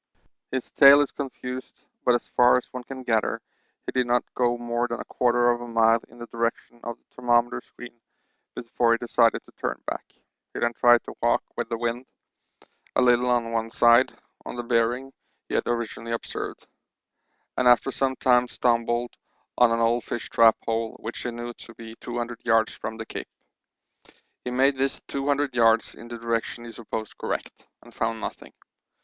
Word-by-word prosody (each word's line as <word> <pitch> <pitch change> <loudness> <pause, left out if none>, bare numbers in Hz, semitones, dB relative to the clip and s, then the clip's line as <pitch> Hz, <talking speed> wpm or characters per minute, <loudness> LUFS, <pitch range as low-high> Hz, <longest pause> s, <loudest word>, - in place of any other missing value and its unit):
His 130 -2 -4
tale 140 0 +8
is 145 - -1
confused, 130 -2 -7 0.2
but 125 - +4
as 120 - -3
far 125 0 +5
as 125 - -3
one 125 -1 -6
can 130 +1 -8
gather 115 -3 0 0.5
he - - -3
did 125 -1 0
not 120 0 +2
go 120 -1 +1
more 120 0 -1
than 120 0 -4
a - - -6
quarter 120 0 +2
of 120 0 -2
a 120 - -7
mile 115 0 +4
in 120 - -18
the 120 - -7
direction 115 0 -3
of 120 0 -5
the - - -41
thermometer 120 -1 +1
screen 120 -1 -13 0.5
before 115 0 +1
he - - +2
decided 115 -1 +2
to - - -19
turn - - -2
back. - - -4 0.5
He - - -3
then 120 0 +1
tried 120 0 +5
to - - -9
walk - - +2
with - - -3
the 115 - -2
wind 120 +2 -3 0.9
a - - +4
little 125 0 +4
on 120 -2 +1
one 115 0 -1
side 120 +2 +4 0.3
on - - -7
the 120 - -4
bearing 120 +3 0 0.3
he - - -7
had - - 0
originally 115 -1 -3
observed, 115 - -5 0.9
and 125 - +2
after 125 +2 +5
some 135 0 0
time 125 -1 +3
stumbled 120 0 0 0.4
on 125 -1 +5
an 115 0 +1
old 115 +1 +2
fish 120 - -5
trap 115 -1 +6
hole, 115 0 -1
which 115 +1 -6
he - - -3
knew 120 0 -6
to 115 0 -13
be 115 0 -10
200 120 -1 -5
yards 115 -1 +2
from 110 +1 -6
the 110 - -6
Cape. - - -7 1.1
He - - -3
made 135 +2 +2
this 135 +1 -1
200 140 -1 -1
yards 115 -1 +3
in 120 - -12
the 120 0 -7
direction 115 0 -3
he 115 - -8
supposed 110 -1 -6
correct, - - -5 0.2
and - - -16
found 115 0 -2
nothing. - - -7
120 Hz, 185 wpm, -25 LUFS, 115-125 Hz, 1.1 s, tale